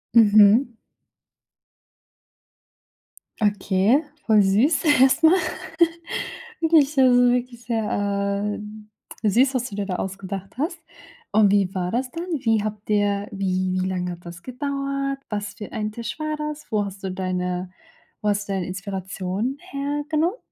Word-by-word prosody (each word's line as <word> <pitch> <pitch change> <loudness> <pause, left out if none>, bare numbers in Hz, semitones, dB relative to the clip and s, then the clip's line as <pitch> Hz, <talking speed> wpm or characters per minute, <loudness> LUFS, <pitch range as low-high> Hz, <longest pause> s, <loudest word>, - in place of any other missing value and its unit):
Mhm. 215 +3 +6 2.7
Okay, 205 +5 +3 0.3
voll 215 -2 +6
süß 225 - +3 0.2
erst 265 +4 +5
mal. 320 +3 +8 1.3
Wirklich, 320 -3 +4
so 270 - +3
so, - - +7
also 245 0 +5
wirklich 245 -1 -3
sehr, 205 -2 -1 0.7
äh, 210 - +4
süß, 260 +6 +3
was 250 -1 -1
du 200 - -8
dir 205 -1 -2
da 185 -2 -3
ausgedacht 195 +2 -5
hast. 310 +7 -2 0.5
Und 210 -2 +5
wie 195 -2 +2
war 180 -1 -2
das 250 +2 -1
dann? 335 +1 -5
Wie 225 -3 +1
habt 210 -1 -5
ihr, 205 -1 +1
wie 185 -1 -1
wie - - -1
lang 180 -1 -2
hat 175 0 -8
das 170 0 -10
gedauert? 275 +1 -3
Was 205 -1 -4
für 210 - -9
ein 215 0 -3
Tisch 235 +6 -6
war 310 0 -2
das? 300 0 -5
Wo 210 -1 +1
hast 195 0 -8
du 190 - -2
deine 180 -1 -3 0.5
wo 210 - +1
hast 205 0 -1
du - - 0
deine 190 -2 -1
Inspiration 190 +5 -4
hergenommen? 295 - -1
210 Hz, 145 wpm, -23 LUFS, 195-265 Hz, 2.7 s, mal